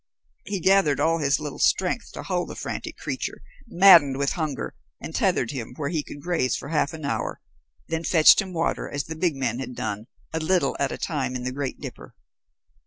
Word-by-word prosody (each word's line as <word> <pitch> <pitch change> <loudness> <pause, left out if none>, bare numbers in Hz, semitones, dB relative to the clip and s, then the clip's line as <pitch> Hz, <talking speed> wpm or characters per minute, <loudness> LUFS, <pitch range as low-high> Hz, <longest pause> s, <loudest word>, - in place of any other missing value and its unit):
He 200 -1 -2
gathered 190 -5 +3
all 165 +1 +2
his 145 -1 +2
little 150 -2 -6
strength - - +1
to - - -7
hold - - -1
the - - -7
frantic - - -5
creature, - - -4 0.3
maddened 170 -8 +7
with 140 0 0
hunger, 155 -5 -3 0.3
and - - -7
tethered 120 - +1
him 125 -3 -6
where 140 0 -3
he 160 -2 -1
could 145 0 -11
graze 170 -7 0
for 140 - -8
half 150 -3 0
an 155 -2 -7
hour, 140 - -2 0.5
then 160 0 -2
fetched 160 +3 +6
him 190 -2 -7
water 165 -1 -1
as 145 0 -2
the 160 +4 -7
big 165 -1 0
man 125 -3 -2
had 125 -2 -6
done, 105 +1 -4 0.3
a 160 - 0
little 160 -3 +1
at 140 -1 0
a - - -4
time 135 -5 -2
in 125 - -4
the 130 - -2
great 140 0 -4
dipper. - - -9
150 Hz, 205 wpm, -25 LUFS, 135-165 Hz, 0.5 s, maddened